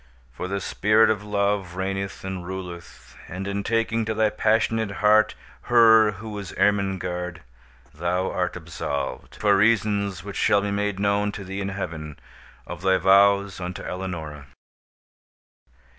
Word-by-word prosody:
for 75 +9 -6
the 100 +1 -2
Spirit 110 +3 +3
of 105 -1 -2
Love 100 -3 -1
reigneth 95 +1 -3
and 95 -1 -5
ruleth, 90 -2 -9
and, 95 +3 -6
in 100 0 -2
taking 115 +1 0
to 110 0 -3
thy 110 -1 +2
passionate 110 0 +1
heart 105 +1 +4 0.3
her 110 -3 +6
who 105 +2 -8
is 100 - -8
Ermengarde, 90 -3 0 0.5
thou 90 +4 -1
art 90 -1 -2
absolved, 80 -4 -5
for 105 -1 +3
reasons 100 -3 +1
which 100 -1 -7
shall 100 - +3
be 100 0 -2
made 100 -1 -1
known 100 0 +1
to 100 - -7
thee 95 +1 -5
in 100 - -2
Heaven, 80 -6 -6 0.5
of - - -8
thy 95 0 +3
vows 100 +1 +4
unto 90 0 -5
Eleonora." 80 -6 -6
100 Hz, 145 wpm, -24 LUFS, 90-105 Hz, 0.5 s, her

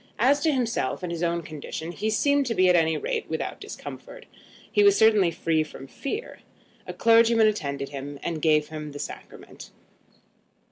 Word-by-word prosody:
As 270 +6 +3
to 315 +1 +2
himself 230 - -1
and 175 - -3
his 170 -1 -4
own 170 0 0
condition, 155 +2 -7
he 210 +5 -2
seemed 285 +5 +2
to 230 - -1
be, 185 - +4
at 180 - +5
any 160 -2 +2
rate, 470 -3 -3
without - - -4
discomfort, - - -9 0.5
and 415 - +5
was 405 -1 +6
certainly 215 -5 +5
free 165 -1 0
from 155 -3 -7
fear. 280 - -6 0.5
A - - -4
clergyman 230 0 +5
attended 140 -10 -1
him, 140 0 -7
and 165 -2 -3
gave 150 -1 +2
him 150 -2 -7
the - - -7
sacrament. - - -9
180 Hz, 175 wpm, -25 LUFS, 155-235 Hz, 0.5 s, was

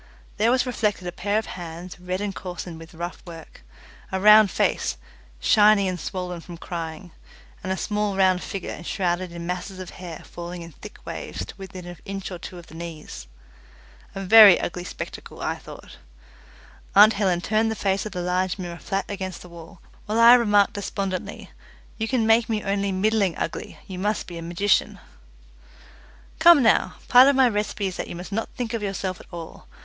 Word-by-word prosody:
There 220 +2 +3
was 250 +1 +2
reflected 210 -6 -1
a - - -3
pair 205 +4 -1
of 220 - -1
hands, 175 0 -8
red 180 +2 -4
and 205 -1 -2
coarsened 175 -2 -7
with 165 +1 -13
rough 170 +1 -6
work, 165 -2 -12 0.5
a 190 - -1
round 210 +1 +7
face, - - 0 0.4
shiny 210 - +5
and 180 -1 -3
swollen 180 0 -5
with 170 -2 -9
crying, 165 0 -6 0.5
and 185 - -3
a 190 - -1
small 210 -1 -1
round 185 -1 +3
figure 195 -2 -5
enshrouded 175 0 -2
in 170 0 -7
masses 180 +2 -4
of 185 -1 -8
hair 175 -3 -9
falling 175 0 -7
in 165 - -11
thick - - -12
waves 90 - -6
to - - -10
within 190 -2 -9
an 175 -2 -9
inch 195 0 -6
or 180 - -6
two 180 - -9
of 175 - -11
the - - -16
knees. 160 - -8 0.9
A 195 - -4
very 205 -1 +9
ugly 175 0 -4
spectacle, - - -8
I - - -2
thought. - - -12 1.0
Aunt 210 +2 +8
Helen 190 -4 +1
turned 215 +4 +1
the 220 - -2
face 195 -2 0
of 215 - -6
the 180 -2 -4
large 180 +1 0
mirror 175 -2 -6
flat 195 0 -2
against 190 -3 -5
the 180 - -13
wall, 170 +2 -13 0.3
while 215 +2 0
I 235 +1 +9
remarked 205 -4 +4
despondently, 195 -2 -4 0.5
"you 220 - -1
can 240 -2 +1
make 225 +1 +4
me 215 -2 -1
only 200 0 -1
middling 195 -1 +1
ugly, - - -5
you 185 -2 -7
must 210 +3 -1
be 170 -2 -8
a - - -7
magician." 175 +4 +1 1.4
"Come 325 -4 +7
now, 220 - +3
part 250 +2 +8
of 280 - +4
my 260 -1 +5
recipe 210 -2 -2
is 185 -2 -3
that - - -4
you - - -7
must 180 +3 -8
not 225 +3 -2
think 240 -2 -3
of 230 - -2
yourself 195 -2 -3
at - - -15
all. 170 -2 -9
190 Hz, 190 wpm, -24 LUFS, 175-210 Hz, 1.4 s, very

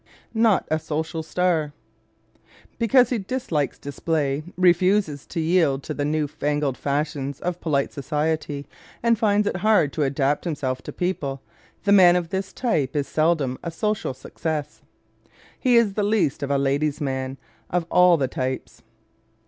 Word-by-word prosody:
Not 225 -4 +3
a 155 - +2
Social 160 +1 -3
Star 160 -2 0 0.6
¶ - - -39 0.4
Because 245 +3 +4
he 240 - +1
dislikes 190 - -2
display, 145 0 -2 0.2
refuses 180 -3 +2
to 170 - -4
yield 160 -5 +2
to 155 - -4
the 145 - -2
new 150 +1 0
fangled 145 -1 -1
fashions 140 -1 -2
of 180 0 -3
polite 140 -4 0
society 150 0 -2 0.4
and 235 0 +4
finds 210 -2 +3
it 195 - -1
hard 195 -7 +3
to 155 - -2
adapt 140 0 +1
himself 135 -6 -2
to - - -7
people, 140 -7 -3 0.4
the 200 - +2
man 180 -3 +7
of 175 -2 -1
this 190 +1 -3
type 155 - -1
is 145 -1 0
seldom 155 -5 +1
a 170 - -4
social 210 -4 -2
success. 150 +2 -5 0.8
He 250 -2 +3
is 230 -4 +4
the 210 - -1
least 205 -8 +1
of 140 - -3
a 140 - +2
"ladies' 140 +2 0
man" 130 -2 -3 0.3
of 175 -1 0
all 180 -1 +6
the 135 -3 0
types. 130 +1 -4
155 Hz, 155 wpm, -23 LUFS, 140-185 Hz, 0.8 s, man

